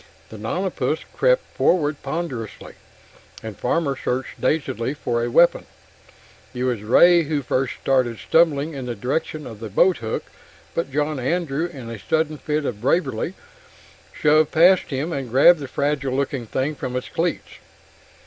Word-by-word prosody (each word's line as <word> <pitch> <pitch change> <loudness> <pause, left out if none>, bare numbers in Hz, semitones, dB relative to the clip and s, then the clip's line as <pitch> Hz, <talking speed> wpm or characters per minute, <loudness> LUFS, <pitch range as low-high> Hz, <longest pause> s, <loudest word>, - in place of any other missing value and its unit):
The - - -10
nonapus - - -2
crept - - +3
forward 150 -4 +1
ponderously, 135 -7 -5 0.7
and 110 -2 -6
Farmer 140 +2 0
searched 130 0 -4
dazedly 135 -4 -1
for 120 -4 -1
a 120 - -1
weapon. 170 +8 +4 0.9
It 125 - -2
was 125 -5 -1
Ray 170 +11 +6
who 145 -1 -1
first 130 0 -1
started 125 -4 +1
stumbling 160 0 +2
in 135 -3 -6
the 120 - -3
direction 145 +6 -3
of 110 -3 -9
the 110 -1 -6
boathook, 115 - +1 0.5
but 165 -5 -2
John 150 +1 -1
Andrew, 160 +3 -1
in 130 -9 -9
a 115 - -7
sudden 155 +6 -1
fit 150 -1 -2
of 105 -5 -4
bravery, 170 +6 0 0.8
shoved 155 0 +3
past 180 +3 +5
him 145 +5 -2
and 135 -4 -4
grabbed 140 +7 +6
the 140 - -6
fragile 140 -1 -1
looking 135 -3 -2
thing 135 +6 -1
from 130 -3 -5
its 125 - -3
cleats. 170 0 -3
140 Hz, 150 wpm, -22 LUFS, 125-160 Hz, 0.9 s, Ray